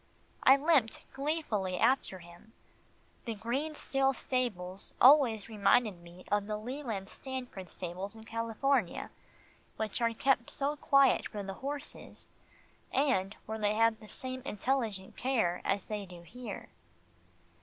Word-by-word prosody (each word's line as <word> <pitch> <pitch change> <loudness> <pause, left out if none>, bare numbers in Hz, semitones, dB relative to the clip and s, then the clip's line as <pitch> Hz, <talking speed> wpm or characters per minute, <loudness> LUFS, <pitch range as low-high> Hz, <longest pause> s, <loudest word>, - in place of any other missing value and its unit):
I 265 +1 +7
limped 280 -6 +3
gleefully 270 - -1
after 230 -3 +2
him. 175 +5 -15 0.7
The 230 -2 -3
Green 260 +9 -2 0.2
Hill 270 0 +4
stables 200 -9 -3
always 250 -6 +6
reminded 210 -2 +2
me 175 +1 -14
of 205 -1 +2
the 210 -1 -2
Leland 225 -4 -4
Stanford 250 -7 -7
stables 185 +4 -6
in 220 - -11
California, 230 0 0 0.7
which 220 +2 -2
are 230 0 +3
kept 255 -1 +2
so 285 +2 -1
quiet 275 -2 +4
for 205 -1 -5
the 195 0 -5
horses, 285 +6 -6 0.6
and 235 -8 +1
where 220 +1 -4
they 210 0 +1
have 225 0 +3
the 215 - -13
same 260 0 -5
intelligent 220 -5 -2
care 225 -9 +1
as 200 -1 0
they 210 -2 -4
do 175 -1 -11
here. 220 +4 -8
225 Hz, 135 wpm, -32 LUFS, 195-265 Hz, 0.7 s, I